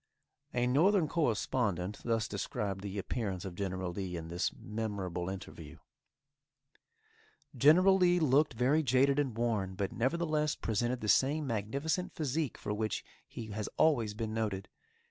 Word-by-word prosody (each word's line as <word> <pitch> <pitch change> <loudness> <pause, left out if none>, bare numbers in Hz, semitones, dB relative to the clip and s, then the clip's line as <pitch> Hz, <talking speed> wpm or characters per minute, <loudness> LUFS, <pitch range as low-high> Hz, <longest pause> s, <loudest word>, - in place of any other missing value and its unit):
A 120 0 +1
northern 165 +7 +4
correspondent 110 - 0
thus 115 -1 0
described 100 -1 -3
the 100 0 -5
appearance 100 -2 -3
of 95 - -5
General 95 -1 -3
Lee 90 -1 -4
in 80 0 -7
this 85 +1 -1
memorable 100 -5 -3
interview: 95 0 -8 1.8
"General 180 +9 +6
Lee 180 -1 +4
looked 145 -2 +3
very 135 +7 +3
jaded 135 +1 +3
and 130 -6 -1
worn, 105 -6 0
but, 100 +1 -2
nevertheless, 150 +3 0
presented 120 +3 -1
the 110 - -3
same 145 +7 +3
magnificent 140 - -2
phisique 155 - -1
for 105 - -3
which 110 0 -2 0.2
he 110 -2 -8
has 105 0 -3
always 115 -10 +3
been 110 0 -3
noted. 105 -4 -2
115 Hz, 140 wpm, -32 LUFS, 100-145 Hz, 1.8 s, General